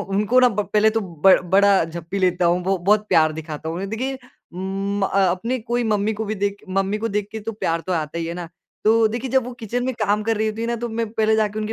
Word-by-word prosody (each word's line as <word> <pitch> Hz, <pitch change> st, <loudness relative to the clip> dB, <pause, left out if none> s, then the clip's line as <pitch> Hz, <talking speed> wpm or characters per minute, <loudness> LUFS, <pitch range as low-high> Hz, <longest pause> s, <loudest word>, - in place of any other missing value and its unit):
ह -, -, -4 dB
उनको 210 Hz, +5 st, +2 dB
ना 250 Hz, -, +6 dB
ब 210 Hz, -2 st, -1 dB
पहले 215 Hz, +1 st, +4 dB
तो 225 Hz, +1 st, 0 dB
ब 185 Hz, -1 st, +3 dB, 0.2 s
बड़ा 195 Hz, -2 st, +5 dB
झप्पी 170 Hz, +3 st, -5 dB
लेता 180 Hz, -1 st, +1 dB
हूँ 175 Hz, +1 st, +2 dB
बो 195 Hz, +1 st, +1 dB
बहुत 205 Hz, +4 st, +2 dB
प्यार 155 Hz, -1 st, +4 dB
दिखाता 155 Hz, 0 st, -6 dB
हूँ 165 Hz, -, -3 dB
उन्हें। 195 Hz, +2 st, -4 dB
देखिए, 260 Hz, +4 st, -3 dB, 0.4 s
म 195 Hz, +2 st, -3 dB
अ, 195 Hz, -, +1 dB
अपने 230 Hz, +9 st, -2 dB
कोई 240 Hz, +1 st, -2 dB
मम्मी 215 Hz, 0 st, +1 dB
को 220 Hz, +1 st, -4 dB
भी 215 Hz, +1 st, -3 dB
देख 200 Hz, 0 st, -1 dB
मम्मी 195 Hz, +2 st, 0 dB
को 230 Hz, -, -2 dB
देख 205 Hz, -1 st, -2 dB
के 220 Hz, -, -5 dB
तो 225 Hz, +2 st, -5 dB
प्यार 165 Hz, -6 st, -1 dB
तो 185 Hz, -, -1 dB
आता 160 Hz, -1 st, -2 dB
ही 165 Hz, -, -2 dB
है 170 Hz, -, -4 dB
ना। 175 Hz, -2 st, -6 dB, 0.4 s
तो 225 Hz, +1 st, +5 dB
देखिए 240 Hz, +4 st, -4 dB
जब 265 Hz, -1 st, +2 dB
वो 250 Hz, -, -6 dB
किचन 245 Hz, +3 st, -2 dB
में 260 Hz, -, -2 dB
काम 210 Hz, 0 st, +1 dB
कर 225 Hz, 0 st, 0 dB
रही 220 Hz, +1 st, 0 dB
होती 215 Hz, +1 st, -3 dB
है -, -, -1 dB
ना 235 Hz, -, -1 dB
तो 240 Hz, +1 st, -4 dB
मैं 230 Hz, 0 st, -2 dB
पहले 220 Hz, -1 st, +2 dB
जाके 215 Hz, -1 st, 0 dB
उनके 215 Hz, +1 st, -3 dB
205 Hz, 275 wpm, -22 LUFS, 185-220 Hz, 0.4 s, ना